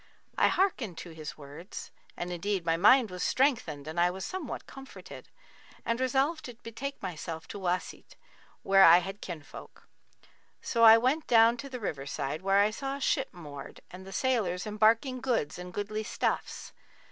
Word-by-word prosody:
I - - +4
hearkened 260 - 0
to 170 +1 -8
his 155 -2 -8
words 150 +6 -9 0.3
(and 175 +1 -4
indeed 180 +1 -2
my 165 -1 +2
mind 220 +5 +5
was 180 -1 -6
strengthened 195 - 0
and 160 +2 -4
I 175 +1 +4
was 190 +1 -5
somewhat 370 -8 -5
comforted) 270 0 -12 0.6
and 230 +1 -1
resolved 270 +5 +1
to 245 - -8
betake 265 +5 -6
myself 165 -2 -6
to 205 - -7
Wasit,[FN#41] 180 -1 -3 0.5
where 195 0 +6
I 170 -1 +9
had 195 +3 -4
kinfolk. 160 -5 -10 0.7
So 230 -1 0
I 225 0 +10
went 260 +7 0
down 230 0 +6
to 275 +4 -7
the 255 -2 -6
river 145 -10 -4
side, 140 +2 -3
where 195 +1 +2
I 210 +1 +3
saw 270 +4 -4
a - - -7
ship 270 0 0
moored 145 -6 -10
and 180 +1 -10
the 195 - -11
sailors 200 -5 0
embarking 225 +5 +2
goods 230 - -1
and 180 0 -8
goodly 205 +2 -3
stuffs. 215 - -3
200 Hz, 170 wpm, -29 LUFS, 175-250 Hz, 0.7 s, I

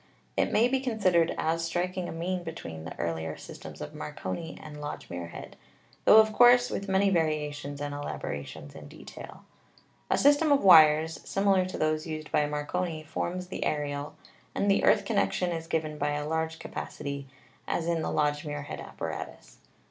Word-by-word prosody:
It - - +1
may 230 +3 +4
be 265 +1 +1
considered 190 -10 +2
as 165 +1 0
striking 180 +2 -2
a - - -5
mean 175 +3 -2
between 80 - -7
the 80 - -8
earlier 80 -1 -3
systems - - -10
of - - -6
Marconi 160 - -5
and 150 -1 -9
Lodge 145 - -6
Muirhead, 85 -1 -7 0.5
tho 215 - +8
of 220 0 +6
course 245 +2 +6
with 200 0 -4
many 195 +1 +3
variations 150 -4 -1
and 145 0 -3
elaborations 75 - -6
in 75 -1 -10
detail. - - -11 0.7
A - - +3
system 290 +2 +4
of 280 - +4
wires, 160 -3 +7
similar 195 -2 +2
to 185 - -6
those 155 +1 0
used 155 -1 -6
by 150 - +2
Marconi, 155 +2 -3
forms 180 +3 -4
the - - -3
aerial, 145 -1 -2 0.4
and 200 - +2
the 195 - +2
earth 205 - +4
connection 200 -4 +1
is 165 -1 -4
given 155 -2 -2
by 145 +1 0
a 145 0 -3
large 160 +1 -1
ca - - -9
pacity, 140 -1 -5 0.4
as 165 - -1
in 170 -1 0
the - - -2
Lodge 145 0 +1
Muirhead 145 -2 -5
apparatus. - - -7
160 Hz, 170 wpm, -28 LUFS, 145-185 Hz, 0.7 s, tho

